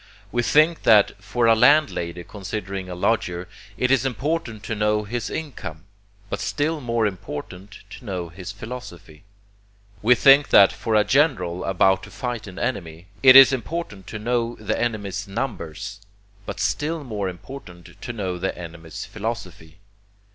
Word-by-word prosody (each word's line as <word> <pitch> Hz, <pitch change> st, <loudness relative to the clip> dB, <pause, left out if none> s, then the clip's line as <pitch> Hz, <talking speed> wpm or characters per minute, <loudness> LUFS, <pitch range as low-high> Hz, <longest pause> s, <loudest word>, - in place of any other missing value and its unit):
We 120 Hz, -, +1 dB
think 155 Hz, +6 st, +3 dB
that 105 Hz, -2 st, +4 dB
for 115 Hz, +4 st, 0 dB
a 115 Hz, -, +6 dB
landlady 110 Hz, -, +3 dB
considering 95 Hz, -1 st, -6 dB
a 90 Hz, -, -5 dB
lodger, 90 Hz, -2 st, -1 dB, 0.3 s
it 125 Hz, +1 st, +1 dB
is 135 Hz, -2 st, +4 dB
important 130 Hz, -3 st, -2 dB
to -, -, -3 dB
know 105 Hz, 0 st, +1 dB
his 110 Hz, +1 st, -4 dB
income, 90 Hz, -, -6 dB, 0.4 s
but -, -, -4 dB
still 145 Hz, +10 st, -1 dB
more 115 Hz, -3 st, 0 dB
important 95 Hz, 0 st, -6 dB
to -, -, -11 dB
know 90 Hz, -5 st, -4 dB
his 90 Hz, +3 st, -8 dB
philosophy. 100 Hz, -7 st, -10 dB, 0.8 s
We 125 Hz, +4 st, +5 dB
think 140 Hz, +3 st, +6 dB
that 100 Hz, -, +7 dB
for 110 Hz, -2 st, -2 dB
a 105 Hz, -, +5 dB
general 105 Hz, -, +1 dB
about 95 Hz, 0 st, +3 dB
to 95 Hz, -, -11 dB
fight 120 Hz, -2 st, -5 dB
an 95 Hz, -1 st, -10 dB
enemy, 90 Hz, -8 st, -4 dB
it 130 Hz, -1 st, +8 dB
is 135 Hz, 0 st, +10 dB
important 120 Hz, -, -5 dB
to 105 Hz, -, -6 dB
know 120 Hz, +2 st, -1 dB
the 110 Hz, 0 st, -3 dB
enemy's 100 Hz, -4 st, -2 dB
numbers, 100 Hz, -, -5 dB, 0.5 s
but 100 Hz, 0 st, -5 dB
still 150 Hz, -, -1 dB
more 105 Hz, -7 st, -3 dB
important 90 Hz, -2 st, -11 dB
to 120 Hz, -, -5 dB
know 95 Hz, -6 st, -4 dB
the 95 Hz, +2 st, -2 dB
enemy's 85 Hz, -2 st, -8 dB
philosophy. 100 Hz, -7 st, -6 dB
105 Hz, 155 wpm, -23 LUFS, 95-125 Hz, 0.8 s, is